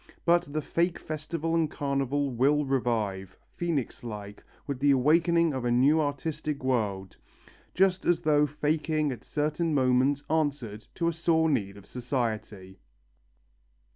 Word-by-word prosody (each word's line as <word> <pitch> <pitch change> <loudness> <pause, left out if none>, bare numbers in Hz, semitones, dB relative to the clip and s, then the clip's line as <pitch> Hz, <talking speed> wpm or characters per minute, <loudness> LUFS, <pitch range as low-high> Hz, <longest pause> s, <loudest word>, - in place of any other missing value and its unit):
But 175 -3 +3
the 155 0 -2
fake 170 +3 0
festival 160 +1 -4
and 165 -2 +2
carnival 140 -1 -1
will 140 +5 +2
revive, 110 -8 -1 0.2
phœnix 165 -10 -2
like, 105 -3 -8 0.2
with 140 -3 -4
the 145 +1 +3
awakening 160 +4 +3
of 130 -2 -3
a 120 - 0
new 135 +6 +4
artistic 150 0 -3
world 105 -7 -1 0.6
just 190 0 +2
as 175 -1 +3
though 150 -2 +3
faking 150 +1 0
at 125 -3 -7
certain 150 +2 -1
moments 130 +2 +2
answered 140 -9 -2
to 170 - 0
a 170 - +1
sore 160 -1 +2
need 100 -7 -1
of 100 - -14
society. 110 -6 -4
145 Hz, 140 wpm, -28 LUFS, 125-160 Hz, 0.6 s, new